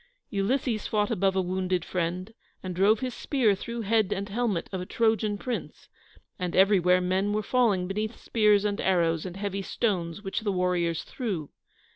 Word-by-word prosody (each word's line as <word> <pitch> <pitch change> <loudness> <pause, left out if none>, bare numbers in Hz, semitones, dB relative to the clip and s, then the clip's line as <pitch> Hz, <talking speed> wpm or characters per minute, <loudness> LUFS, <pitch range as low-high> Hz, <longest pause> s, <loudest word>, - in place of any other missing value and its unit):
Ulysses 220 +3 0
fought 210 -1 0
above 190 +1 +1
a 190 - +2
wounded 185 -1 -1
friend, 180 +4 -3 0.3
and 185 -2 -4
drove 205 +5 +4
his 255 -1 -2
spear 250 -8 +2
through 235 +4 -5
head 215 -1 +2
and 200 +1 -2
helmet 210 -4 -1
of 190 -2 -3
a - - -5
Trojan 220 -2 +1
prince, 245 +3 -5 0.5
and 180 -1 -2
everywhere 185 -2 +5
men 190 +3 0
were 215 0 0
falling 210 -6 +2
beneath 215 +4 -3
spears 210 -2 +3
and 205 -1 -1
arrows 170 -2 +1
and 180 +1 -8
heavy 200 -1 -3
stones 185 -3 -2
which 195 - -2
the 215 -2 -1
warriors 180 -3 0
threw. 190 - -4
195 Hz, 170 wpm, -27 LUFS, 180-215 Hz, 0.5 s, everywhere